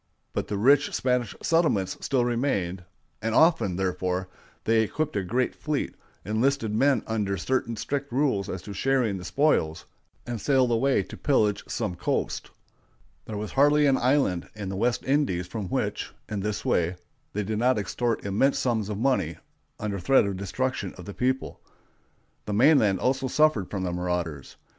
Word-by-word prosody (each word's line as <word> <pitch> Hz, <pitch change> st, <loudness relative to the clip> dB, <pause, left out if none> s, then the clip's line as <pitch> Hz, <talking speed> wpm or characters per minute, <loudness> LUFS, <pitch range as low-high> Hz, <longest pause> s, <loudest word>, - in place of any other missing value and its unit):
But -, -, -2 dB
the 105 Hz, -, -2 dB
rich 140 Hz, +7 st, +4 dB
Spanish 125 Hz, -4 st, 0 dB
settlements 155 Hz, -, +2 dB
still 130 Hz, -3 st, +1 dB
remained; 100 Hz, -8 st, -1 dB, 0.4 s
and 115 Hz, +1 st, -1 dB
often, 160 Hz, -, +4 dB
therefore, 90 Hz, 0 st, -1 dB, 0.3 s
they 115 Hz, 0 st, +3 dB
equipped 150 Hz, +7 st, -2 dB
a 100 Hz, -, +1 dB
great 120 Hz, +7 st, 0 dB
fleet, 150 Hz, -2 st, -2 dB, 0.3 s
enlisted 110 Hz, +2 st, +1 dB
men 130 Hz, +1 st, +3 dB
under 105 Hz, -3 st, -1 dB
certain 115 Hz, +4 st, -1 dB
strict 140 Hz, +5 st, -3 dB
rules 120 Hz, -7 st, +1 dB
as 90 Hz, -2 st, -5 dB
to 100 Hz, -, -7 dB
sharing 125 Hz, -2 st, +1 dB
the 90 Hz, -, -8 dB
spoils, 90 Hz, -, +1 dB, 0.4 s
and 120 Hz, -3 st, -4 dB
sailed 130 Hz, -3 st, +3 dB
away 130 Hz, +4 st, +2 dB
to -, -, -10 dB
pillage 105 Hz, -8 st, +1 dB
some -, -, -2 dB
coast. 90 Hz, 0 st, -2 dB, 0.8 s
There 110 Hz, -, -5 dB
was 105 Hz, 0 st, -4 dB
hardly 145 Hz, +2 st, +4 dB
an 135 Hz, -2 st, +4 dB
island 125 Hz, -10 st, +1 dB
in 100 Hz, -3 st, -5 dB
the 95 Hz, -, -4 dB
West 120 Hz, +5 st, 0 dB
Indies 135 Hz, -, +1 dB
from 100 Hz, +1 st, -5 dB
which, -, -, -2 dB, 0.2 s
in 105 Hz, -, -3 dB
this 105 Hz, +1 st, -3 dB
way, 85 Hz, +1 st, +1 dB, 0.4 s
they 105 Hz, -, -1 dB
did 105 Hz, +2 st, -2 dB
not 125 Hz, +1 st, +3 dB
extort 115 Hz, +3 st, -1 dB
immense 105 Hz, +8 st, +2 dB
sums 110 Hz, -5 st, 0 dB
of 105 Hz, -, -3 dB
money 130 Hz, +3 st, 0 dB, 0.4 s
under 105 Hz, -2 st, -3 dB
threat 105 Hz, +7 st, +4 dB
of 100 Hz, -1 st, -2 dB
destruction 100 Hz, +2 st, -3 dB
of 90 Hz, -, -10 dB
the 100 Hz, -, -7 dB
people. 130 Hz, +4 st, -1 dB, 0.8 s
The 105 Hz, -, -3 dB
mainland 110 Hz, -4 st, +4 dB
also 130 Hz, +1 st, 0 dB
suffered 140 Hz, -8 st, +2 dB
from 95 Hz, -2 st, -3 dB
the 90 Hz, -, -1 dB
marauders. 90 Hz, -5 st, -3 dB
110 Hz, 165 wpm, -26 LUFS, 95-135 Hz, 0.8 s, rich